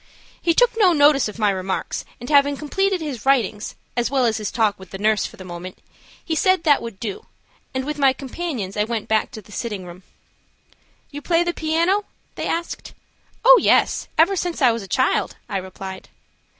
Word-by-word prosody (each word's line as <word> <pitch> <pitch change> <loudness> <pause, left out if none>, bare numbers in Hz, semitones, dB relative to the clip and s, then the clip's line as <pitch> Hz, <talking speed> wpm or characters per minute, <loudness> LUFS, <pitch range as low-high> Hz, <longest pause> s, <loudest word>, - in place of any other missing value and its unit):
He 335 -1 +2
took - - +5
no 395 -6 +5
notice 290 -3 +5
of 210 - -8
my 210 -2 +2
remarks, 190 0 -3
and 245 - -8
having 285 0 +4
completed 380 +5 0
his 275 -8 -5
writings, 235 -6 +1 0.2
as 240 -1 0
well 265 -2 +2
as 220 -1 +1
his 215 -2 -3
talk 220 -4 0
with 190 -2 -12
the 195 - -7
nurse 215 +1 +1
for - - -15
the 185 - -9
moment, 180 +1 -8 0.5
he 325 - -2
said 370 +1 +2
that 295 -3 +4
would 230 -5 -8
do, 210 -4 -6 0.5
and 260 0 -1
with 300 0 -4
my 275 -2 +5
companions, 260 - -5
I 210 - +2
went 225 -1 -3
back 220 -1 +1
to 215 - -10
the 210 - -18
sitting 205 -4 -4
room. 175 +1 -11 1.1
"You 290 0 -7
play 335 +2 +2
the 345 0 -1
piano?" 335 +6 +1 0.3
they - - -4
asked. 340 +1 -4 0.5
"Oh, - - +9
yes; - - +3
ever 340 +5 +4
since 350 -2 -2
I 255 -5 +5
was 230 0 -3
a 195 - -9
child," 260 +8 +1
I 205 -4 -2
replied. 190 0 -8
255 Hz, 200 wpm, -22 LUFS, 210-320 Hz, 1.1 s, Oh